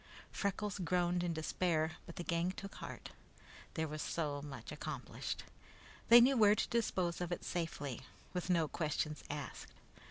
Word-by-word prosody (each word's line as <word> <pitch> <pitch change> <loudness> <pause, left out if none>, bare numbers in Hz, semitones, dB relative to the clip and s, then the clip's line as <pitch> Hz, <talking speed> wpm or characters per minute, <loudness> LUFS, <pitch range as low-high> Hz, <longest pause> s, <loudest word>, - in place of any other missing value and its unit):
Freckles 200 0 -1
groaned 175 0 +2
in 175 - +1
despair, 160 0 +1 0.2
but 170 - -8
the 175 - -4
gang 170 +1 +1
took 195 +1 -7
heart. - - -7 0.6
That 160 -1 0
was 155 0 -4
so 145 -4 -1
much 140 -2 -7
accomplished. - - -4 0.7
They 235 +1 +12
knew 260 +3 +6
where 210 -2 +7
to - - 0
dispose 185 -7 +1
of 175 0 -2
it 175 - -2
safely, 150 -7 -2 0.3
with 180 0 -2
no 170 -3 +4
questions 150 -1 -1
asked. 145 -4 -5
170 Hz, 155 wpm, -36 LUFS, 155-185 Hz, 0.7 s, They